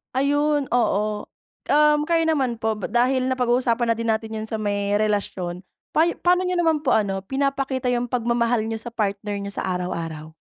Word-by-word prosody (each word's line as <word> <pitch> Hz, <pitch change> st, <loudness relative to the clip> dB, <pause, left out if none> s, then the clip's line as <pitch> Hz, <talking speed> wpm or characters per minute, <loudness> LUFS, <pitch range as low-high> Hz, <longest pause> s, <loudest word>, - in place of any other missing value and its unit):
Ayun 290 Hz, +1 st, +1 dB
oo. 215 Hz, -3 st, 0 dB, 0.4 s
Um, 300 Hz, 0 st, +4 dB
kayo 330 Hz, -1 st, +3 dB
naman 275 Hz, -7 st, +1 dB
po, 220 Hz, -1 st, -2 dB
dahil 255 Hz, +2 st, +2 dB
napag-uusapan 245 Hz, -2 st, +1 dB
na -, -, +2 dB
din 230 Hz, 0 st, -3 dB
natin 220 Hz, 0 st, -1 dB
yung 215 Hz, -, -5 dB
sa 220 Hz, -, -2 dB
may 205 Hz, -1 st, -1 dB
relasyon. 200 Hz, -4 st, -1 dB, 0.3 s
Pa 320 Hz, +2 st, +3 dB
p'ano 360 Hz, +1 st, +2 dB
niyo 360 Hz, -, 0 dB
naman 325 Hz, -3 st, +2 dB
po 290 Hz, -3 st, +2 dB
ano, 195 Hz, -3 st, 0 dB
pinapakita 270 Hz, 0 st, -1 dB
yung 245 Hz, 0 st, 0 dB
pagmamahal 235 Hz, -1 st, +1 dB
niyo 225 Hz, 0 st, -3 dB
sa 235 Hz, +1 st, -8 dB
partner 205 Hz, -1 st, -2 dB
niyo 200 Hz, 0 st, -4 dB
sa 195 Hz, -, -3 dB
araw-araw? 165 Hz, -3 st, -5 dB
235 Hz, 170 wpm, -23 LUFS, 210-275 Hz, 0.4 s, Um